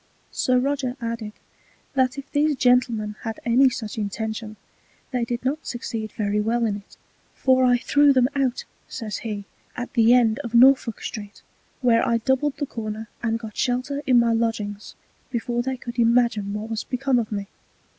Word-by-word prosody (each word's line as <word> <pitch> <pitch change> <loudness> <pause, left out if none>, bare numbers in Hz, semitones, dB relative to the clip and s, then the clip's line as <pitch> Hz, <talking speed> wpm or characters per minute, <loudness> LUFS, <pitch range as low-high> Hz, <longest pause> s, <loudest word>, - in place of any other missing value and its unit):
Sir 255 0 +1
Roger 265 -1 -1
added, 230 -2 -4 0.6
that 260 0 +1
if 275 0 -8
these 295 +1 +2
gentlemen 235 -4 +2
had 225 -2 -5
any 255 +3 +5
such 225 -3 -5
Intention, 215 +1 -4 0.6
they 250 -3 0
did 240 +1 -4
not 290 +4 -2
succeed 225 -3 -4
very 210 -1 0
well 230 +2 +1
in 205 -2 -1
it: 200 - -16 0.4
for 260 -1 +3
I 245 -1 +5
threw 290 +3 +4
them 255 -2 +4
out, 265 -3 0 0.2
says 220 -4 -5
he, 210 -3 -5 0.3
at 245 0 -5
the 235 -1 +5
End 235 -1 +3
of 235 -4 -5
Norfolk 255 -2 +5
street, 205 -1 -7 0.4
where 235 -2 +4
I 235 -2 +2
doubled 265 +4 0
the 285 - -1
Corner, 220 -3 -6
and 230 -1 0
got 220 -2 -9
shelter 255 +3 -1
in 255 -2 +5
my 235 -1 +3
Lodgings 215 -3 -2 0.3
before 240 -1 -1
they 260 +1 -3
could 240 0 -7
imagine 230 -3 +3
what 215 +2 -5
was 225 - -2
become 260 0 0
of 225 -2 -3
me. 200 -1 -3
235 Hz, 175 wpm, -24 LUFS, 220-255 Hz, 0.6 s, any